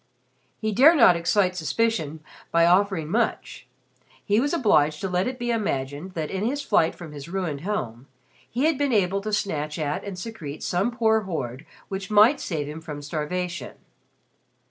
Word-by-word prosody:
He 215 - -2
dare 280 - +6
not 230 - +7
excite 180 +2 +1
suspicion 160 -2 -1 0.3
by 170 0 +4
offering 180 -2 +2
much. 225 - -2 0.6
He 205 +1 +3
was 285 +4 0
obliged 155 - +3
to 195 - -1
let 180 +2 0
it 255 0 -4
be 240 -1 -2
imagined 165 - -2
that 155 -2 -3
in 190 +1 -2
his 280 +6 -1
flight 200 -10 +2
from 170 -3 -10
his 145 +1 -9
ruined 170 -6 -3
home 135 - -4 0.4
he 250 +4 -2
had 315 -3 +2
been 285 -3 +1
able 195 -1 +2
to 215 +2 -4
snatch 155 -8 -2
at 150 -2 -2
and 200 -2 -6
secrete 180 -8 -7
some 185 +6 0
poor 225 -2 +2
hoard 155 - -5 0.2
which 195 0 -5
might 215 +7 +5
save 155 -5 -3
him 155 +2 -7
from 150 -2 -7
starvation. 175 +5 -4
185 Hz, 170 wpm, -25 LUFS, 155-220 Hz, 0.6 s, not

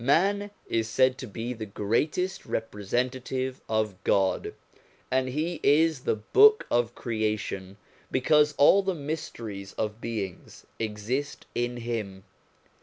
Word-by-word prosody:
Man 200 +9 +3 0.2
is 115 -1 0
said 130 +2 +3
to 130 - -6
be 115 +4 -4
the 110 -2 -6
greatest 135 - -1
representative 125 +5 -2
of 105 -4 -1
God, 95 -1 +1 0.6
and 130 0 +2
he 155 +6 -2
is 155 +1 +4
the - - +2
Book 420 - +5
of 120 0 +1
Creation 105 -4 -2 0.3
because 150 +2 +3
all 190 +7 +7
the 190 -1 -1
mysteries 115 -10 -5
of 110 +1 -3
beings 105 -6 -5
exist 110 +6 -3
in 120 0 -1
him. 110 -5 -4
120 Hz, 120 wpm, -27 LUFS, 105-145 Hz, 0.6 s, all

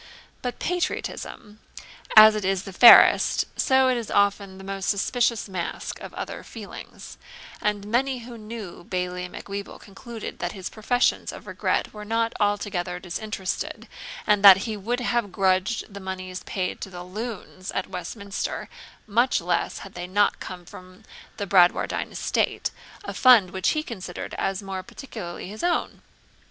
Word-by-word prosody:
But 245 -1 -4
patriotism, 245 -10 -3 0.6
as 215 0 +11
it 215 -1 -3
is 190 0 0
the 195 - -9
fairest, 235 +5 +8
so 265 -1 +3
it 255 -1 +2
is 230 -2 -5
often 200 -1 +1
the 195 - -11
most 195 -1 -3
suspicious 230 +2 +1
mask 185 -3 -4
of - - -8
other - - -6
feelings; - - -10 0.4
and 205 -1 -1
many 255 +5 +1
who 240 -1 -9
knew 215 -5 -8
Bailie 180 0 -3
Macwheeble 200 +2 -7
concluded 225 +3 -9
that 175 - -3
his 190 -3 -6
professions 245 +3 +1
of - - -11
regret - - -1
were 210 -1 -8
not 225 +2 0
altogether 200 -4 -1
disinterested, 190 +2 -4 0.4
and 210 -1 +3
that 195 -1 +9
he 220 -2 -3
would 235 +5 -2
have 240 -4 0
grudged 190 +3 0
the 200 - -7
moneys 185 -1 -6
paid 185 -2 -3
to - - -5
the 180 -1 -8
LOONS 190 -1 -7
at 185 - -1
Westminster 200 +3 -5 0.4
much 240 +4 +2
less 175 +1 -1
had 195 - -12
they 175 0 -6
not 205 +2 +2
come 180 -1 -8
from 185 +4 -13 0.3
Bradwardine 185 -3 +2
estate, - - -1 0.3
a - - -5
fund 230 -8 +6
which 190 -1 0
he 305 - 0
considered 185 - -7
as 195 +1 -1
more 190 -1 -4
particularly 225 -7 -8
his 215 +2 -7
own. 350 0 0
200 Hz, 150 wpm, -25 LUFS, 185-225 Hz, 0.6 s, as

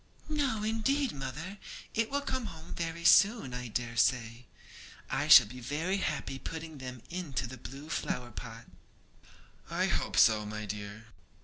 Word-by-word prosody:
'No, 280 -8 0
indeed, 245 +5 +1
mother; 150 +9 -6 0.3
it 225 0 +1
will 285 +1 0
come 260 -4 -2
home 160 -1 -9
very 170 0 -4
soon, 205 - +5
I 125 0 -4
dare 115 +1 -3
say. 115 0 +1 0.6
I - - 0
shall - - +10
be 125 +5 -10
very 155 +10 -1
happy 135 -6 -2
putting 160 -1 -7
them 125 -2 -8
into 170 -8 -3
the 130 +2 -8
blue 135 +6 -9
flower 125 -6 -3
pot.' 115 +1 -8 1.0
'I - - +1
hope - - -1
so, 110 -1 +6
my 105 0 -5
dear.' 105 +2 -6
135 Hz, 150 wpm, -31 LUFS, 120-195 Hz, 1.0 s, shall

